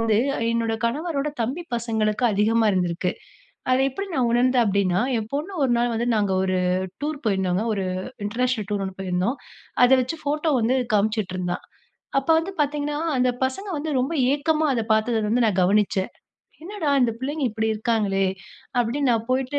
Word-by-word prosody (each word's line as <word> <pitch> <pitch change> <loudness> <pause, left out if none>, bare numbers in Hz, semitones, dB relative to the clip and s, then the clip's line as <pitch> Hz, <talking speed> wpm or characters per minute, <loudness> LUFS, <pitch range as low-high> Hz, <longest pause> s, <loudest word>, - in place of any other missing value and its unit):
வந்து 225 -2 +2 0.3
என்னோட 230 -1 0
கணவரோட 300 +3 -2
தம்பி 265 +10 -3
பசங்களுக்கு 220 -1 -1
அதிகமா 220 +3 +2
இருந்திருக்கு. 180 -1 0 0.6
அத 255 - +4
எப்படி 395 +9 -5
நான் 250 -3 +2
உணர்ந்தேன் 245 0 +3
அப்படினா 195 -3 +1 0.2
ஏ - - 0
பொண்ணு 300 +7 -3
ஒரு 250 - +2
நாள் 240 0 +1
வந்து 235 +2 -1
நாங்க 205 -2 +1
ஒரு 185 -1 0 0.4
டூர் 300 0 -2
போயிருந்தோங்க. 190 -2 +1
ஒரு 195 -2 -1 0.4
இன்டர்நேஷனல் 230 0 -1
டூர் 205 -2 -1
ஒண்ணு 190 -1 -6
போயிருந்தோம். 185 +7 -1 0.5
அத 245 - +4
வெச்சு 255 +6 -3
ஃபோட்டோ 300 +2 0
வந்து 235 +4 +2 0.2
காமிச்சிட்டு 210 -2 0
இருந்தா. 180 -1 -2 0.6
அப்ப 270 - -12
வந்து 365 +4 -5
பார்த்தீங்கனா 295 0 -1 0.2
அந்த 250 0 +3
பசங்க 390 +11 -4
வந்து 305 +2 -3
ரொம்ப 270 +6 -2 0.2
ஏக்கமா 310 +1 +1
அத 230 -3 0
பார்த்தத 220 0 0
வந்து 235 +2 +3
நா - - +3
கவனிச்சேன். 195 0 +2 0.5
"என்னடா 370 -3 -4
இந்த 235 -2 +2
பிள்ளைங்க 285 +3 -2
இப்படி 220 +1 -1
இருக்காங்களே" 210 -3 +1 0.5
அப்படினு 250 +4 +1
நா 235 - +4
போய்ட்டு 260 +2 0
235 Hz, 160 wpm, -23 LUFS, 210-280 Hz, 0.6 s, அத